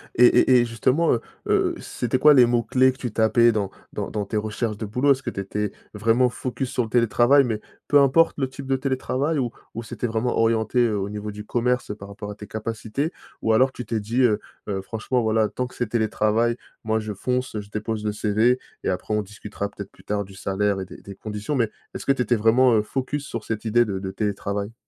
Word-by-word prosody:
Et 125 - +7
et 125 +1 +6
et - - +1
justement, 125 +8 +1
heu 115 - 0 0.3
heu, - - +2
c'étaient 125 +1 -2
quoi 150 +2 +7
les 125 -3 +7
mots-clés 120 +2 +3
que 130 - -14
tu 120 -4 -4
tapais 115 +2 +4
dans 100 -3 -1 0.2
dans - - -3
dans 105 -1 -2
tes 100 - -5
recherches 110 +1 -2
de 110 - -4
boulot? 125 +7 +2
Est-ce 135 0 -8
que - - -2
tu - - -6
étais 105 +1 -2 0.2
vraiment 115 +4 +3
focus 125 +1 -4
sur 125 - 0
le 110 - -6
télétravail, 120 +4 +4
mais 110 -3 -2 0.3
peu 145 - +5
importe 150 +5 +4
le 130 -2 0
type 135 +1 -9
de 135 - +2
télétravail 135 +3 -1
ou 120 -3 -1 0.2
ou 115 - -5
c'était 115 +2 -4
vraiment 115 +2 -1
orienté, 115 +1 +2
heu, 110 -3 0
au 95 - -3
niveau 105 0 -5
du 105 +1 -8
commerce, 125 +1 0
heu, - - -4
par 100 -1 -11
rapport 105 +1 -7
à 105 - -6
tes 105 0 -10
capacités? 115 - -3 0.3
Ou 110 - +2
alors 130 +4 +4
tu 125 - -7
t'es 115 -2 -1
dit, 115 +5 0
heu 110 -4 +3 0.3
heu: 95 -1 -1
«Franchement, 110 +5 -2
voilà, 110 -1 +2
tant 125 - -3
que - - -16
c'est 120 - -1
télétravail, 110 +1 +1 0.3
moi 110 0 +1
je 105 -1 -4
fonce, 125 +4 -2
je 100 - -14
dépose 105 +1 -3
le 105 - +1
CV 110 +4 +2 0.2
et - - 0
après 95 +3 -2
on 105 - +2
discutera, 105 0 -6
peut-être, 100 -1 -9
plus - - -20
tard 105 0 -1
du 95 - -14
salaire 100 +1 0
et - - -4
des - - -12
des 100 - -10
conditions» 105 +6 -5
mais 115 -5 +1 0.2
est-ce - - -7
que 140 - +5
tu 135 - +1
étais 120 +1 +2
vraiment, 115 +3 +4
heu, 110 - +4
focus 135 +6 -3
sur 115 -5 -5
cette 110 -1 -4
idée 120 +2 +4
de 100 -3 -3
de 95 - -4
télétravail? 100 +1 -3
115 Hz, 240 wpm, -24 LUFS, 105-125 Hz, 0.3 s, Et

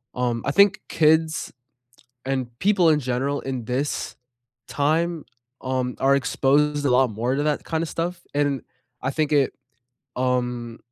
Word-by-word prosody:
um 120 -2 -1
I 140 - +1
think 200 +4 +4
kids 160 0 +2 0.7
and 130 -2 -1
people 190 -4 +4
in 150 -1 +4
general 130 +3 -1
in 130 -3 -4
this 130 +4 -2 0.5
time, 160 +3 0 0.4
um, 130 -1 -2
are 135 +1 +4
exposed 145 +2 +1
a - - +3
lot 125 0 +4
more 120 +5 -1
to 145 - 0
that 150 -1 0
kinda 165 0 -1
stuff, 170 +2 -4
and 145 -2 +1 0.4
I 130 - -1
think 155 0 -1
it 140 -3 +3 0.6
um, 125 -2 -1
140 Hz, 145 wpm, -23 LUFS, 125-155 Hz, 0.7 s, think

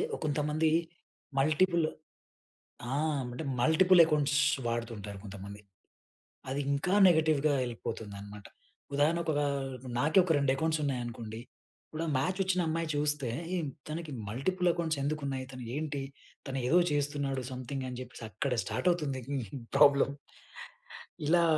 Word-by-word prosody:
ఒ - - -6
కొంతమంది 150 +1 +1 0.7
మల్టిపుల్ 165 +3 +3 1.1
ఆ! - - +1 0.4
అంటే 140 +6 -5 0.2
మల్టిపుల్ 180 +5 +6
అక్కౌంట్స్ 150 -2 +2 0.3
వాడుతుంటారు 115 -4 -4
కొంతమంది. 100 +1 -8 0.9
అది 140 +2 -1
ఇంకా 175 +7 0
నెగెటివ్‌గా 155 -3 +3
వెళ్ళిపోతుందన్నమాట. 105 -4 -6 0.5
ఉదాహరణకు 160 +4 +2
ఒక 145 - +1 0.6
నాకే 155 +7 +2
ఒక 170 - +1
2 140 -2 +2
అకౌంట్స్ 160 +1 0
ఉన్నాయనుకోండి. 120 -5 -3 0.5
ఇప్పుడు 160 +1 -4
మ్యాచ్ 185 +8 0
వచ్చిన 185 -1 +1
అమ్మాయి 165 +1 -1
చూస్తే 145 -3 +1 0.3
ఏం 170 - -1 0.2
తనకి 160 0 -5 0.2
మల్టిపుల్ 180 - 0
అకౌంట్స్ 165 -3 -1
ఎందుకు 155 +2 -1
ఉన్నాయి? 135 -1 -3
తను 130 -1 -8
ఏంటి? 145 -2 -2 0.4
తను 135 -1 -3
ఏదో 175 +6 +5
చేస్తున్నాడు 140 -2 -1
సంథింగ్ 130 +1 -4
అని 125 - -6
చెప్పేసి 125 -2 -10
అక్కడ 125 +7 -1
స్టార్ట్ 125 +9 -2
అవుతుంది 150 -6 -2 0.6
ప్రాబ్లమ్. 140 -1 +6 1.1
ఇలా 170 +2 +5
145 Hz, 120 wpm, -31 LUFS, 125-160 Hz, 1.1 s, మల్టిపుల్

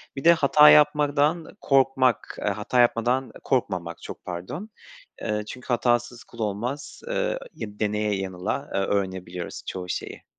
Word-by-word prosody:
Bir 135 - -6
de 170 +1 +8
hata 150 -1 +6
yapmadan 150 +2 +3
korkmak, 135 -3 +2
eee, - - -4
hata 125 - -1
yapmadan 120 +2 +2
korkmamak, 90 -10 -1
çok - - -9
pardon. 95 - -6 0.5
Eee, 105 0 -1
çünkü 125 - -9
hatasız 120 -1 0
kul 115 - -16
olmaz. 115 +7 -4
Eee, - - -1 0.2
ya 105 -1 -8
deneye 105 -1 0
yanıla, 95 +9 -3
eee, - - +1
öğrenebiliyoruz 95 -3 -3
çoğu 90 -1 -5
şeyi. - - -5
120 Hz, 140 wpm, -25 LUFS, 100-145 Hz, 0.5 s, de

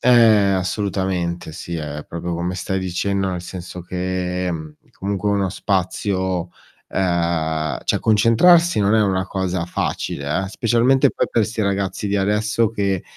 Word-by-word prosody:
Eh, 125 - +3 0.4
assolutamente 95 -3 -1
sì, 85 +2 -7
è 75 -2 -5
proprio 85 +1 -4
come 85 +2 -2
stai 95 +1 -2
dicendo, 95 +1 -1
nel 90 -1 -3
senso 90 0 -7
che, 90 0 -2
mhmm, 80 -3 -5 0.2
comunque 100 +1 -2
uno 100 -1 +1
spazio 95 -1 -1 0.4
uhm, 85 -4 0
cioè, - - +1
concentrarsi 115 +10 +4
non 100 +1 +3
è 110 - +4
una 95 -2 0
cosa 95 -3 -2
facile, 75 -1 -2
eh. - - -5
Specialmente 125 +5 +3
poi - - -1
per 115 - +2
sti 110 +1 -3
ragazzi 100 0 -1
di 100 - -1
adesso 105 +3 +1
che 100 -4 -1
95 Hz, 145 wpm, -21 LUFS, 90-105 Hz, 0.4 s, concentrarsi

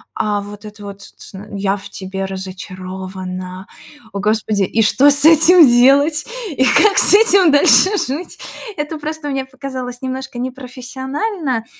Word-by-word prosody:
А 205 -1 -2
вот 205 +1 -11
это 210 0 -12
вот: 200 0 -10
"Ц - - -13
ц 190 - -12
н, 205 +1 -11
я 195 0 -1
в 200 0 -11
тебе 190 0 -6
разочарована". 185 0 -8 0.5
О 200 - -4
господи, 210 -1 -1
и 225 +4 -1
что 275 +7 +3
с 285 +1 +4
этим 325 0 +7
делать 275 +6 +3 0.3
и 260 -2 -1
как 405 +10 +3
с - - +7
этим 395 -7 +4
дальше 375 +7 +4
жить? 295 +6 -5 0.4
Это 300 +2 -5
просто 305 0 -6
мне 270 -1 -3
показалось 260 -2 -8
немножко 260 -1 -6
непрофессионально, 260 - -5
250 Hz, 155 wpm, -16 LUFS, 200-290 Hz, 0.5 s, этим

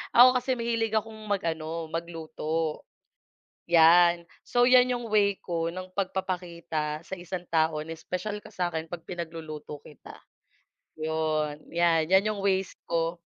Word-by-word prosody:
ako 245 +2 +10
kasi 260 +1 -1
mahilig 230 -2 -1
akong 220 0 -1
mag-ano 165 -4 -2
magluto, 165 -1 -3 0.9
yan. 170 +1 +6 0.2
So 245 - +2
yan 255 0 +6
yung 240 -1 -5
way 200 -2 +3
ko 165 -1 -2
ng 185 0 -7
pag-papakita 170 -5 -3
sa 190 - -6
isang 175 0 -6
tao 160 -1 +2
na 160 +1 -6
special 205 +5 -4
ka - - -11
sakin 175 -3 -2
pag 175 -2 -6
pinagluluto 160 -4 -6
kita. 150 - -13 0.8
Yun, 155 -1 -1 0.2
yan 165 -2 +3
yan 195 +3 +4
yung 200 - -6
ways 190 -1 +1 0.2
ko. 165 +1 0
170 Hz, 135 wpm, -27 LUFS, 160-195 Hz, 0.9 s, ako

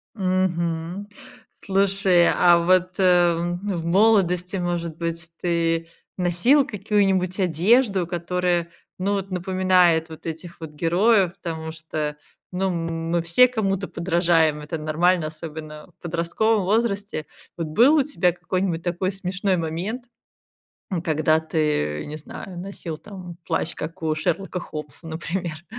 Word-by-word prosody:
Мгм. 185 -1 -1 0.6
Слушай, 195 -2 +4
а 175 -1 +5
вот, 185 +1 +2
а, 175 -2 +4 0.2
в 190 -5 -3
молодости 185 -1 +3
может 170 -2 -3
быть 165 -1 -4
ты 165 -1 0 0.3
носил 185 - +3
какую-нибудь 195 -4 0
одежду, 190 - +3
которая 175 0 -1 0.3
ну 195 +2 0
вот 195 -1 -3
напоминает 180 -3 +2
вот 160 - -11
этих 165 +1 -7
вот 160 -2 -7
героев? 180 +5 +2
Потому 160 -2 -5
что, 155 -2 -4 0.3
ну 185 +1 -1 0.2
м 165 0 -4
мы 170 0 +2
все 170 +10 +5
кому-то 195 -5 -1
подражаем, 170 -3 +2
это 150 +2 -5
нормально, 160 +2 +1
особенно 155 -1 -8
в - - -61
подростковом 175 +6 0
возрасте. 205 -5 0 0.3
Вот 165 -2 -3
был 240 - +5
у 290 - +4
тебя 200 -11 +1
какой-нибудь 175 0 -2
такой 180 +2 -1
смешной 195 0 -1
момент, 175 +10 -3 0.9
м, 175 - -1
когда 155 -2 +2
ты, 150 - -1
не 150 +1 -6
знаю, 175 +3 -9
носил 175 -4 -6
там 180 -2 -10
плащ, - - -1
как 160 +2 -7
у 155 - +1
Шерлока 180 +4 -2
Холмса, 150 -1 -8
например? 165 0 -4
175 Hz, 130 wpm, -23 LUFS, 165-190 Hz, 0.9 s, а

